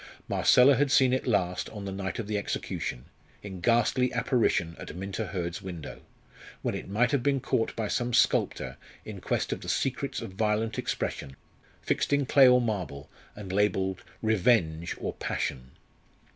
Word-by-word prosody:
Marcella 130 Hz, +2 st, +5 dB
had 145 Hz, 0 st, +2 dB
seen 130 Hz, -2 st, +4 dB
it 130 Hz, -, -1 dB
last 90 Hz, -5 st, 0 dB
on 105 Hz, -2 st, -8 dB
the 95 Hz, -, -4 dB
night 95 Hz, 0 st, -4 dB
of 115 Hz, -, -3 dB
the 105 Hz, +1 st, -3 dB
execution, 65 Hz, -10 st, -3 dB, 0.4 s
in 95 Hz, -3 st, -7 dB
ghastly 120 Hz, +3 st, +2 dB
apparition 90 Hz, -9 st, +1 dB
at -, -, -8 dB
Minta 95 Hz, +3 st, -4 dB
Hurd's 90 Hz, -2 st, -4 dB
window, 85 Hz, -5 st, -8 dB, 0.6 s
when -, -, -1 dB
it -, -, -6 dB
might 120 Hz, +6 st, +2 dB
have 140 Hz, -3 st, +2 dB
been 140 Hz, +1 st, +1 dB
caught 115 Hz, -3 st, -1 dB
by 110 Hz, -2 st, -2 dB
some 120 Hz, +3 st, -1 dB
sculptor 120 Hz, -, +1 dB, 0.3 s
in -, -, -8 dB
quest -, -, -1 dB
of -, -, -7 dB
the -, -, -6 dB
secrets -, -, -1 dB
of -, -, -7 dB
violent 110 Hz, +3 st, 0 dB
expression, 70 Hz, -1 st, -3 dB, 0.5 s
fixed -, -, 0 dB
in 140 Hz, -1 st, +2 dB
clay 135 Hz, +1 st, +6 dB
or 125 Hz, 0 st, +6 dB
marble, 90 Hz, -, -3 dB, 0.2 s
and 95 Hz, -3 st, -7 dB
labelled 95 Hz, -2 st, +1 dB, 0.2 s
"Revenge," 90 Hz, -7 st, +2 dB
or -, -, -3 dB
"Passion." 65 Hz, -2 st, -3 dB
105 Hz, 165 wpm, -28 LUFS, 90-120 Hz, 0.6 s, clay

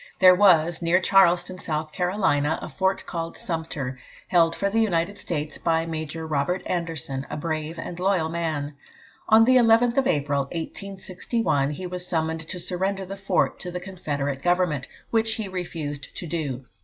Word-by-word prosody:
There 185 Hz, -1 st, +8 dB
was, 175 Hz, -4 st, +4 dB
near 170 Hz, +2 st, +3 dB
Charleston, 185 Hz, -1 st, +3 dB
South 155 Hz, -2 st, -3 dB
Carolina, 180 Hz, -5 st, +1 dB
a -, -, -7 dB
fort 190 Hz, 0 st, 0 dB
called 165 Hz, -1 st, -4 dB
Sumter, 155 Hz, -6 st, -4 dB, 0.3 s
held 165 Hz, -2 st, +4 dB
for 200 Hz, -, 0 dB
the 215 Hz, +3 st, +1 dB
United 195 Hz, -1 st, 0 dB
States 150 Hz, -3 st, -4 dB
by 165 Hz, -1 st, +1 dB
Major 160 Hz, 0 st, -4 dB
Robert 160 Hz, +4 st, -1 dB
Anderson, 160 Hz, -6 st, -3 dB
a -, -, -4 dB
brave 155 Hz, +1 st, -3 dB
and 170 Hz, +1 st, -6 dB
loyal 185 Hz, -3 st, +2 dB
man. 160 Hz, -3 st, -2 dB, 0.6 s
On 220 Hz, +1 st, +7 dB
the 255 Hz, +1 st, +6 dB
11th 235 Hz, +1 st, +4 dB
of 270 Hz, -, +3 dB
April, 140 Hz, -2 st, +1 dB
1861, 185 Hz, -, -2 dB
he 150 Hz, +5 st, -5 dB
was 180 Hz, 0 st, -5 dB
summoned 160 Hz, -1 st, -1 dB
to -, -, -4 dB
surrender 190 Hz, +2 st, -2 dB
the 195 Hz, +2 st, -6 dB
fort 195 Hz, 0 st, 0 dB
to 180 Hz, -, -6 dB
the 180 Hz, 0 st, -4 dB
Confederate 145 Hz, -7 st, -3 dB
Government, 175 Hz, -6 st, +1 dB, 0.2 s
which 225 Hz, -1 st, +2 dB
he 220 Hz, -3 st, -3 dB
refused 165 Hz, -6 st, -5 dB
to -, -, -4 dB
do. 145 Hz, -6 st, -3 dB
170 Hz, 165 wpm, -25 LUFS, 155-190 Hz, 0.6 s, There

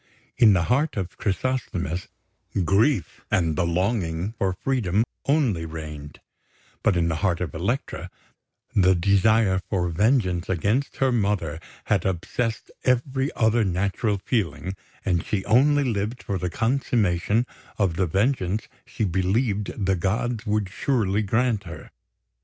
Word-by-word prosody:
In 110 Hz, -4 st, +6 dB
the 90 Hz, -3 st, +2 dB
heart 135 Hz, -, +1 dB
of 95 Hz, -3 st, -3 dB
Chrysosthemis, 95 Hz, -5 st, -2 dB, 0.6 s
grief 100 Hz, -, +2 dB
and 85 Hz, -6 st, +1 dB
the 85 Hz, -2 st, +1 dB
longing 90 Hz, 0 st, -1 dB
for 95 Hz, -, +2 dB
freedom 105 Hz, -1 st, 0 dB, 0.2 s
only 135 Hz, -, +2 dB
reigned; 75 Hz, -2 st, -7 dB, 0.6 s
but 90 Hz, -, +2 dB
in 85 Hz, -1 st, +2 dB
the 80 Hz, -2 st, -1 dB
heart 85 Hz, -1 st, +1 dB
of 85 Hz, -6 st, -3 dB
Elektra 100 Hz, +11 st, -2 dB, 0.7 s
the 95 Hz, -2 st, +5 dB
desire 100 Hz, +2 st, +3 dB
for 90 Hz, -4 st, 0 dB
vengeance 95 Hz, -1 st, +1 dB
against 105 Hz, -, 0 dB
her 135 Hz, -1 st, +2 dB
mother 100 Hz, -9 st, 0 dB, 0.2 s
had -, -, +1 dB
obsessed 110 Hz, +5 st, -2 dB
every 130 Hz, +2 st, +1 dB
other 110 Hz, +1 st, +3 dB
natural 100 Hz, +3 st, 0 dB
feeling, 95 Hz, -, -2 dB, 0.3 s
and 85 Hz, -3 st, +1 dB
she 95 Hz, -3 st, -2 dB
only 140 Hz, +6 st, +4 dB
lived 115 Hz, -1 st, -2 dB
for 100 Hz, -2 st, -2 dB
the 90 Hz, +1 st, -2 dB
consummation 115 Hz, -2 st, +1 dB, 0.3 s
of 95 Hz, -6 st, +1 dB
the 95 Hz, +1 st, +1 dB
vengeance 100 Hz, -, 0 dB, 0.2 s
she -, -, -3 dB
believed 100 Hz, +3 st, 0 dB
the 95 Hz, 0 st, +2 dB
gods 115 Hz, +6 st, -1 dB
would 105 Hz, -1 st, +1 dB
surely 105 Hz, -3 st, 0 dB
grant 110 Hz, 0 st, +1 dB
her. 85 Hz, -4 st, -9 dB
100 Hz, 135 wpm, -24 LUFS, 90-115 Hz, 0.7 s, In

